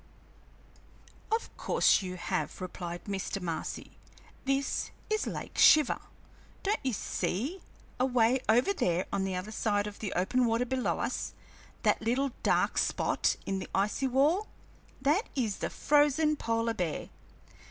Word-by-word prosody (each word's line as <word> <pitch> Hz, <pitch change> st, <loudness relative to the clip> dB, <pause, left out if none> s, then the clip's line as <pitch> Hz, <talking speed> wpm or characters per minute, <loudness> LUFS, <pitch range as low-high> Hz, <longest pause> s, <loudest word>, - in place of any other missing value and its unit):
"Of 450 Hz, +1 st, -1 dB
course -, -, +3 dB
you 185 Hz, -1 st, -5 dB
have," 180 Hz, +1 st, -3 dB
replied 175 Hz, -1 st, -6 dB
Mr. 195 Hz, 0 st, -3 dB
Marcy. 170 Hz, -3 st, -5 dB, 0.5 s
"This 275 Hz, +1 st, 0 dB, 0.2 s
is 430 Hz, 0 st, +1 dB
Lake -, -, -5 dB
Shiver. 305 Hz, -3 st, +6 dB, 0.6 s
Don't 415 Hz, +2 st, +1 dB
you 265 Hz, -, 0 dB
see, 250 Hz, -, -2 dB, 0.4 s
away 250 Hz, -1 st, +3 dB
over 245 Hz, -, +4 dB
there 180 Hz, -, 0 dB
on 195 Hz, -1 st, +1 dB
the 190 Hz, -1 st, -2 dB
other 185 Hz, +4 st, -4 dB
side 205 Hz, -2 st, 0 dB
of 210 Hz, -1 st, -7 dB
the 205 Hz, -, -3 dB
open 245 Hz, +8 st, +2 dB
water 230 Hz, +2 st, +1 dB
below 255 Hz, 0 st, 0 dB
us, -, -, -3 dB, 0.5 s
that -, -, +3 dB
little 255 Hz, +5 st, +1 dB
dark -, -, +2 dB
spot -, -, +1 dB
in 195 Hz, 0 st, -1 dB
the -, -, -7 dB
icy 210 Hz, +7 st, +1 dB
wall? 295 Hz, -, +2 dB, 0.5 s
That 300 Hz, -, +1 dB
is 225 Hz, -7 st, 0 dB
the -, -, -2 dB
frozen 295 Hz, +1 st, +3 dB
polar 230 Hz, -3 st, 0 dB
bear. 175 Hz, -7 st, -3 dB
230 Hz, 140 wpm, -30 LUFS, 195-275 Hz, 0.6 s, Shiver